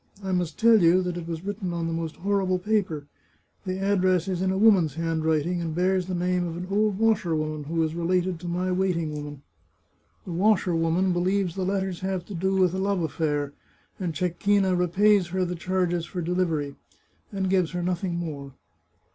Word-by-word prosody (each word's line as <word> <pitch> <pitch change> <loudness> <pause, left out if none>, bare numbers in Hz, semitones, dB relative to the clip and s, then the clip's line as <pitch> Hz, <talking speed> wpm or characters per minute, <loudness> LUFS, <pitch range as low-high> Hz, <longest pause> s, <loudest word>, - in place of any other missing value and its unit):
I 190 - -3
must 180 -4 -1
tell 225 -2 +5
you 175 +2 +5
that 180 -1 -3
it 170 -1 -6
was 165 +1 -5
written 200 -3 -3
on 170 -1 -2
the 165 - -2
most 165 -1 -3
horrible 190 -1 0
paper; 180 -7 -1 0.6
the 185 0 -1
address 185 -2 +2
is 185 -2 -2
in 190 - +1
a 190 - 0
woman's 190 -9 +4
handwriting, 165 +1 0
and 165 -2 -3
bears 185 +1 +1
the 185 - -2
name 180 0 0
of 165 0 -5
an 180 - -5
old 210 -1 +2
washerwoman 160 -9 0
who 165 +2 0
is 160 0 -1
related 175 +1 0
to 175 - -7
my 180 +2 -1
waiting 180 -4 0
maid. 145 -1 -7 0.8
The 180 - -6
washerwoman 180 -2 +2
believes 185 0 0
the 190 0 -2
letters 190 -2 -1
have 190 -2 -3
to 205 - -8
do 190 +2 0
with 185 -2 +3
a 190 - -2
love 195 -2 0
affair, 145 -2 -1 0.5
and 175 -4 -3
Cecchina 185 +3 +1
repays 185 +2 +3
her 185 +1 -1
the 180 - -3
charges 175 -1 -1
for 180 - -5
delivery, 165 -5 -1 0.5
and 195 -2 -1
gives 185 -3 +2
her 175 -1 -2
nothing 180 0 -1
more." 145 -5 -5
180 Hz, 190 wpm, -26 LUFS, 165-190 Hz, 0.8 s, tell